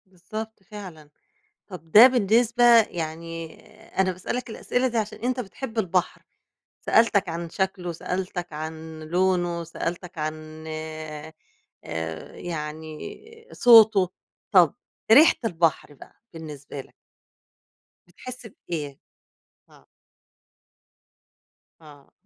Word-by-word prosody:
بالضبط 200 +4 -8
فعلًا. 180 -7 -11 0.6
طَب 170 -5 -11
ده 225 +4 +11
بالنسبة 240 0 +3 0.2
يعني، 165 -2 -6 0.4
أنا 190 -1 +3
باسألك 235 +7 -5
الأسئلة 245 +3 -1
دي 235 -2 -1
عشان 215 0 -3
أنت 250 +1 -1
بتحب 230 +2 -7
البحر، 185 -3 0 0.6
سألتك 215 -4 +3
عن 170 0 -4
شكْله، 185 -1 -2
سألتك 180 0 -4
عن 160 +1 -7
لونه، 175 0 0
سألتك 170 +1 -5
عن 155 0 -6
آآ، 155 -1 -7 1.0
يعني 155 -2 -6 0.3
آآ - - -12
صوته، 220 -6 +7 0.4
طَب - - +6 0.4
ريحة 300 +8 +8
البحر 165 -7 0
بقى 135 - -16 0.2
بالنسبة 150 -4 -8
لك؟ - - -14 1.1
بتحس 250 +7 -10 0.2
بإيه؟ 145 -5 -4 0.7
آه. - - -21 2.0
آه. 145 -3 -16
175 Hz, 95 wpm, -25 LUFS, 160-215 Hz, 2.0 s, ده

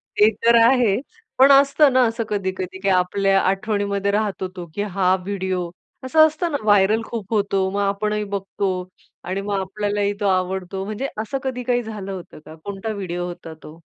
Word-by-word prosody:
ते 210 +1 +6 0.2
तर 235 0 +6
आहे. 235 -4 +4 0.4
पण 270 +2 +7
असतं 280 0 +5
ना 260 - +5
असं 230 +1 -2
कधी-कधी 190 -2 -3
की 195 +1 0
आपल्या 195 +1 +2
आठवणीमध्ये 200 0 0
राहतो 205 -2 -1
तो 175 -1 -6
की 205 - -2
हा 190 -2 +1
व्हिडिओ. 190 -3 -2 0.4
असं 315 +4 +6
असतं 330 +2 -3
ना 285 - 0
व्हायरल 205 +1 +4
खूप 225 -2 -6
होतो, 200 -2 +1
मग 200 - -2
आपणही 210 +1 -1
बघतो 195 0 -2 0.5
आणि 185 +3 -3
मग 200 -1 -2
आपल्यालाही 205 +1 -1
तो 205 - 0
आवडतो. 185 0 -1
म्हणजे 215 +6 -3
असं 225 +5 -3
कधी 255 -2 -3
काही 245 0 0
झालं 210 -3 -6
होतं 185 -5 -9
का? 155 - -11
कोणता 200 +2 -4
व्हिडिओ 175 -3 -4
होता 170 -2 -8
तो? 155 +2 -12
200 Hz, 175 wpm, -21 LUFS, 190-220 Hz, 0.5 s, पण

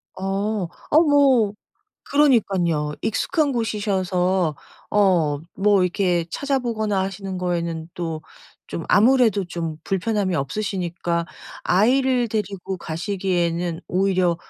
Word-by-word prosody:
어. 195 0 -2 0.2
어 310 +2 +6
뭐 275 -9 +4 0.5
그러니깐요. 190 - +2
익숙한 290 +6 0
곳이셔서 190 - 0 0.3
어 175 -8 +2
뭐 200 -1 +3
이렇게 175 -2 +1
찾아보거나 235 -8 -1
하시는 190 0 -4
거에는 170 -2 -2
또 165 -3 -4 0.5
좀 165 - -4
아무래도 220 -2 +4
좀 165 -3 -4
불편함이 195 -1 -1
없으시니까 175 0 -2 0.4
아이를 250 +5 +3
데리고 200 -3 -3
가시기에는 175 -1 -2
오히려 185 -2 +2
190 Hz, 255 characters per minute, -22 LUFS, 175-215 Hz, 0.5 s, 어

